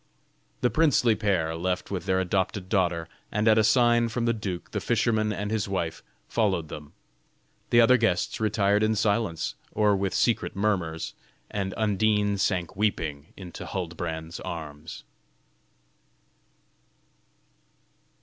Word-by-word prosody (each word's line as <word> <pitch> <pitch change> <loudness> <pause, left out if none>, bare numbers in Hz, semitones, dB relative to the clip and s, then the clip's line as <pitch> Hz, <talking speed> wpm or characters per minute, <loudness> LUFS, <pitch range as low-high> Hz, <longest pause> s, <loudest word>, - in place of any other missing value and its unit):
The 125 - +2
princely 125 -4 +4
pair 95 -7 0
left 90 +3 -2
with 90 -4 -4
their 95 0 +2
adopted 95 +1 -1
daughter; 85 -5 +1 0.2
and 105 +2 0
at 110 0 +6
a - - +4
sign 120 +1 +4
from 115 +1 -2
the 115 - +2
duke, 95 -5 -5
the 105 - -1
fisherman 110 0 +1
and 105 0 -3
his 105 -2 -1
wife 85 -4 -2 0.3
followed 95 -8 0
them. 75 -1 -9 0.8
The 120 - +6
other 125 +2 +6
guests 100 -7 0
retired 105 -1 +2
in 110 0 +2
silence 100 -5 0 0.2
or 105 -1 +3
with 95 0 -1
secret 120 - +1
murmurs, 90 -6 -1 0.4
and 95 -2 -3
Undine 105 -1 +1
sank 90 -3 0
weeping 80 -8 -2
into 90 -3 -8
Huldbrand's 85 -2 -5
arms. 80 -1 -7
100 Hz, 130 wpm, -26 LUFS, 85-110 Hz, 0.8 s, at